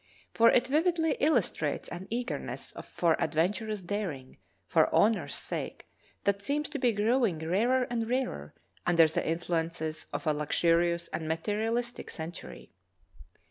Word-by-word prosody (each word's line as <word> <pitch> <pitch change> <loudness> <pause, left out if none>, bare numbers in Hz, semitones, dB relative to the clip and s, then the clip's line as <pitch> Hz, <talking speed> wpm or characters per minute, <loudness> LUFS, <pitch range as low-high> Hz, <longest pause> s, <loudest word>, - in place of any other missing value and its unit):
For 230 0 +6
it 245 - +4
vividly 320 +3 +2
illustrates 305 +2 +1
an 175 +2 -7
eagerness 240 +2 -4 0.2
for 165 -2 +2
adventurous 195 +7 0
daring 175 -9 -4 0.3
for - - +3
honor's 220 +1 +2
sake - - -4 0.4
that 200 0 +1
seems 290 +7 -1
to 290 - -4
be 250 -2 +3
growing 220 -2 +2
rarer 215 +11 +2
and 230 -2 -2
rarer 245 - -2 0.3
under 170 -2 +5
the 155 - -1
influences 165 -1 -2
of - - -4
a 155 - +3
luxurious 170 +3 +1
and 160 - -4
material 210 +8 -1
istic 240 0 -3
centur}'. 160 - -8
200 Hz, 135 wpm, -30 LUFS, 165-240 Hz, 0.4 s, For